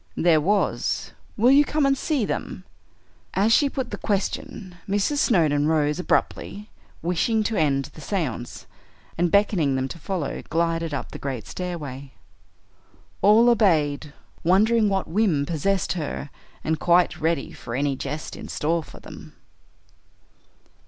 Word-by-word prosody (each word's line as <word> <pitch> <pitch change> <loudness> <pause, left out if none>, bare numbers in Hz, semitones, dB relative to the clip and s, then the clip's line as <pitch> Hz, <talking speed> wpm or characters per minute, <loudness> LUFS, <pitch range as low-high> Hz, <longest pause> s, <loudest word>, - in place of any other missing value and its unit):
"There 160 -2 +4
was. 200 +5 0 0.3
Will 240 +4 +5
you 285 +2 +7
come 300 0 0
and 275 0 +3
see 275 -4 -1
them?" - - -4 0.7
As 210 +4 +3
she 285 +3 +4
put 265 -3 -4
the - - -5
question, 200 -2 -3 0.2
Mrs. 205 +9 +1
Snowdon 155 - +3
rose 150 0 +1
abruptly, 205 +3 -1 0.3
wishing 195 +6 +1
to 220 - -1
end 140 -5 +1
the 155 - -12
séance, 140 - -4 0.5
and 175 +1 +1
beckoning 175 -8 +2
them 130 0 -1
to 170 - -8
follow 175 -3 -3
glided 165 0 0
up 140 - -4
the - - -8
great 130 -5 -4
stairway. 145 -7 -6 1.1
All 220 +4 +6
obeyed, 155 -11 +2 0.3
wondering 210 +5 +4
what 195 -1 -1
whim 175 -7 +1
possessed 175 +5 0
her, 150 -4 -5 0.3
and 160 0 -1
quite 175 +2 +3
ready 160 -3 0
for 115 - -7
any 140 +1 0
jest 145 +4 -5
in - - -8
store 165 +3 -1
for - - -13
them. - - -12
170 Hz, 140 wpm, -24 LUFS, 150-210 Hz, 1.1 s, you